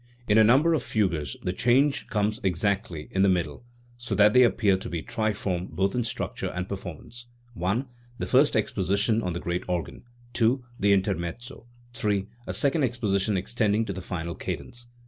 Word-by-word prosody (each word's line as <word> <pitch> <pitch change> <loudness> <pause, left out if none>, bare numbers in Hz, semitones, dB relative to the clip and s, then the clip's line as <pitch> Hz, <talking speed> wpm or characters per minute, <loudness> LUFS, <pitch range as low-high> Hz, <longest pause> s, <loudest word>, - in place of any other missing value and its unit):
In 105 +1 +5
a - - +8
number 135 +9 +5
of 155 - +1
fugues 90 -11 -1
the 90 - -1
change 130 +8 +2
comes 105 +2 -1
exactly 95 -3 -1
in 95 - +1
the 100 - +5
middle, 90 +4 -1 0.3
so 120 0 -3
that 105 0 +5
they 125 - +7
appear 110 -5 +4
to 100 +5 -5
be 85 -2 -4
triform 105 -5 -2
both 95 +1 0
in 125 - 0
structure 110 - -3
and 90 +1 -4
performance: 100 +6 -8 0.4
(i) 105 +9 +1 0.3
the - - -3
first 135 +3 +4
exposition 100 +1 +1
on 90 -5 -2
the 85 - -3
great 85 +1 -2
organ; 90 -2 -3 0.3
(2) 120 +2 +2
the 100 +1 +3
intermezzo; 100 +6 -2 0.3
(3) 105 -4 0 0.2
a - - -3
second 140 +3 +2
exposition 105 -5 0
extending 110 +2 0
to 100 - -4
the 95 - -6
final 85 -2 -4
cadence. 120 +8 -6
105 Hz, 175 wpm, -26 LUFS, 95-120 Hz, 0.4 s, a